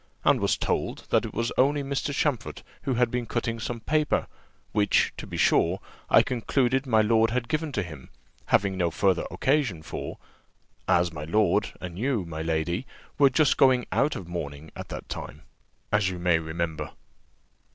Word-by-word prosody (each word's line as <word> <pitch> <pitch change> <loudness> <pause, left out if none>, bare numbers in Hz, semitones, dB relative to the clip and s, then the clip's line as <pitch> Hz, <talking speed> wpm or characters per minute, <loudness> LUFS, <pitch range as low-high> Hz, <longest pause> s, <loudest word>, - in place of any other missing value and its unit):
and - - +4
was - - +2
told, - - -2
that - - +3
it - - -7
was 115 +1 0
only 140 +2 +3
Mr. 140 +1 -2
Champfort 140 -5 -1 0.2
who 130 - 0
had 120 -1 +2
been 125 -2 -2
cutting 115 0 -2
some 120 +1 -4
paper; 150 +6 +1 0.5
which, 105 -1 +2
to - - -8
be - - -6
sure, - - +3 0.3
I - - +7
concluded 130 +2 0
my 110 -3 +4
lord 115 +1 +3
had 120 +1 -1
given 155 +2 -1
to 105 - 0
him, 75 -7 -10 0.4
having 100 -1 +2
no 90 -2 +1
further 95 +1 +1
occasion 130 - 0
for, - - -6 0.7
as 85 -1 +3
my 75 -1 -5
lord 100 +2 +2
and 90 0 -7
you, 120 -6 0
my 80 -1 -5
lady, 80 +7 -1 0.3
were 140 -1 +7
just 145 +2 +3
going 130 -2 +5
out 140 +2 +2
of 90 - -7
mourning 80 -3 -6
at - - -8
that - - -7
time, - - -7 0.5
as 105 -3 +3
you 90 - -5
may 85 -2 +2
remember." 80 0 -4
110 Hz, 175 wpm, -26 LUFS, 85-130 Hz, 0.7 s, I